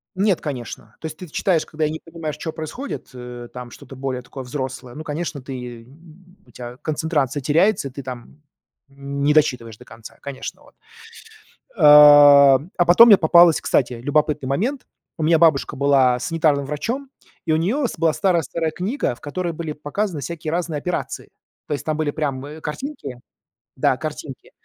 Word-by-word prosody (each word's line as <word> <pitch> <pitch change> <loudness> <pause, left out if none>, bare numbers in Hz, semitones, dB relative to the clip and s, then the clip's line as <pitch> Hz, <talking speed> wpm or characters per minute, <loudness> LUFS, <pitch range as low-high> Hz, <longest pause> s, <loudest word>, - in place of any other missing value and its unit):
Нет, 195 -1 +1
конечно. 120 -6 -7
То - - -10
есть 155 0 -6
ты 180 - -9
т 150 - -20
читаешь 175 -5 0
когда 155 0 -3
и 150 - -1
не 160 - -5
понимаешь, 165 -3 -7
чё 160 +1 -5
происходит, 160 - -7
э, 125 -1 -9
там 125 -1 -8
что-то 135 - -12
более 130 -1 -4
такое 130 +2 -9
взрослое. 130 -1 -6
Ну, 155 - -7
конечно, 155 -1 -5
ты 125 -3 -8 0.6
у - - -21
тя 120 0 -9
концентрация 150 -2 -2
теряется, 165 +3 +2
и - - -17
ты 140 - -8
там 130 +3 -10 0.5
н 140 0 -7
не 150 - +3
дочитываешь 125 -8 +1
до - - -16
конца, 115 -1 -13
конечно, 140 -2 -8
вот. - - -21 1.0
Э, 180 - -5
а 145 +2 +7
потом 205 +7 +8
мне 205 -4 +8
попалась 170 0 +5
кстати, 125 -2 +1
любопытный 145 +3 -1
момент. 245 - -2 0.3
У 160 - -3
меня 165 +1 +3
бабушка 155 -4 +3
была 135 -3 +3
санитарным 150 0 0
врачом, 235 - -4 0.4
и 160 - +1
у - - +3
нее 235 - 0
с - - -8
была 165 -1 +2
старая-старая 170 -3 0
книга, 185 - -2
в - - -24
которой 170 +3 -4
были 160 -1 -5
показаны 155 +4 -3
всякие 160 0 -5
разные 170 -2 -2
операции. 180 +3 -4 0.4
То 150 - -2
есть 140 - -5
там 155 - -1
были 155 -2 -1
прям, 140 -4 -3
э, 150 +2 -9
картинки. 150 - -6 0.6
Да, - - +2
картинки. - - -8
150 Hz, 180 wpm, -21 LUFS, 135-165 Hz, 1.0 s, потом